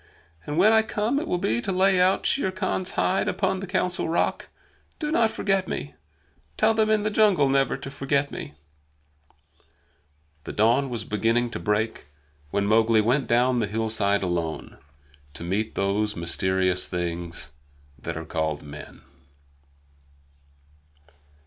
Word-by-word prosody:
"And 150 - -3
when 210 +5 +6
I 220 - +6
come 220 +4 -1
it 325 - -5
will 180 - 0
be 115 -8 0
to 195 - -2
lay 190 0 +3
out 185 +1 +2
Shere 190 -9 +1
Khan's 185 -1 -2
hide 190 - +1
upon 190 -1 0
the 195 - -6
Council 180 -2 -1
Rock. 170 - -1 0.5
Do 300 -1 -3
not 230 -8 +3
forget 195 -4 0
me! 70 0 -4 0.6
Tell 220 +1 +4
them 220 -1 +2
in 215 -1 +2
the 215 - 0
jungle 205 -9 +4
never 135 0 +2
to 135 - -8
forget 140 +1 0
me!" 75 - -7 1.9
The - - -6
dawn 120 +6 +2
was 120 -3 -3
beginning 115 +3 0
to - - -5
break 105 -5 -1 0.4
when 100 +6 0
Mowgli 110 +1 +4
went 125 +6 +1
down 125 +1 +3
the 110 - 0
hillside 105 -2 0
alone, 85 -3 -3 0.6
to - - -6
meet 100 +5 -2
those 105 +2 0
mysterious 95 +2 0
things 85 -3 -4 0.5
that 70 - -5
are 80 - -6
called 80 -2 -2
men. 75 0 -11
120 Hz, 145 wpm, -25 LUFS, -, 1.9 s, when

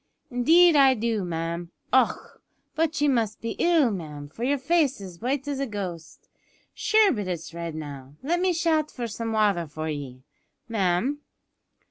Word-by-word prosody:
"Indeed 325 +7 +5
I 270 -2 +6
do, 225 -3 -1
ma'am. 170 0 -3 0.2
Och! - - +1 0.3
but 320 0 0
ye 295 - +3
must 230 -6 +1
be 230 - -4
ill, 325 -8 +4
ma'am, 150 -6 -6
for 225 +10 -8
yer 280 +3 +2
face 285 -2 +1
is 185 -3 -9
as - - -27
white 270 +4 -1
as 285 -2 -2
a 275 - -1
ghost. 180 -8 -7 0.5
Shure 435 -2 +4
but 210 -7 -3
it's 170 -2 -5
red 170 -1 -5
now. 140 -3 -8
Let 340 +5 +1
me 370 0 +2
shout 320 -3 +1
for 245 - -5
some 225 +1 -4
wather 205 -6 +2
for 155 +2 -5
ye, 135 -4 -6 0.4
ma'am." 220 +6 0
225 Hz, 170 wpm, -26 LUFS, -, 0.5 s, I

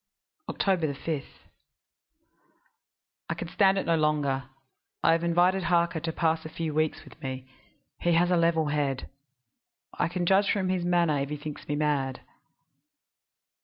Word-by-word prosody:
"Oct. - - -2 0.3
5. 155 -3 -3 2.1
I - - +1
can 170 - -5
stand 195 0 +3
it - - -1
no 165 - +2
longer; 145 -4 +1 0.6
I - - +5
have 165 +1 +2
invited 180 +2 +2
Harker 170 -1 +2
to 165 +1 -3
pass 160 0 0
a 155 - -7
few 160 -1 -4
weeks 155 0 0
with - - -16
me 130 -1 -5 0.5
he 175 - +2
has 175 +2 +3
a - - +4
level 165 -2 +2
head. 145 -3 -1 0.9
I - - 0
can 175 +1 -2
judge 195 +3 +4
from 190 -3 0
his 185 -1 0
manner 170 -4 +2
if 140 0 -2
he 150 - -3
thinks 150 0 -8
me 145 - -1
mad. 145 -3 0
165 Hz, 155 wpm, -27 LUFS, 150-175 Hz, 2.1 s, I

